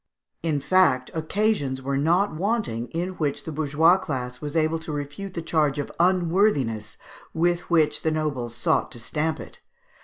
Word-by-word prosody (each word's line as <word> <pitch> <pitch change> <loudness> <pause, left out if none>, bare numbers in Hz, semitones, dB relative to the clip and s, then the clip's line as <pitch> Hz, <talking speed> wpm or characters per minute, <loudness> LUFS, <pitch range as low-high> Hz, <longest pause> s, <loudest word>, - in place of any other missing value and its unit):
In 160 -3 0
fact, 160 -5 +3
occasions 160 -4 0
were 135 +1 -2
not 170 +8 +2
wanting 180 - -1
in 175 +3 -3
which 145 -3 -1
the 160 - -5
bourgeois 155 +4 +3
class 125 -6 -4
was 150 +1 -5
able 160 0 +2
to 160 -1 -7
refute 145 +7 -5
the 170 - -3
charge 155 -4 +1
of 145 - -3
unworthiness 170 - +2 0.4
with 175 +1 +1
which 155 -3 +2
the 160 - +1
nobles 145 -7 -2
sought - - +1
to 120 - -9
stamp 155 +7 -2
it. - - -11
155 Hz, 160 wpm, -25 LUFS, 140-175 Hz, 0.4 s, fact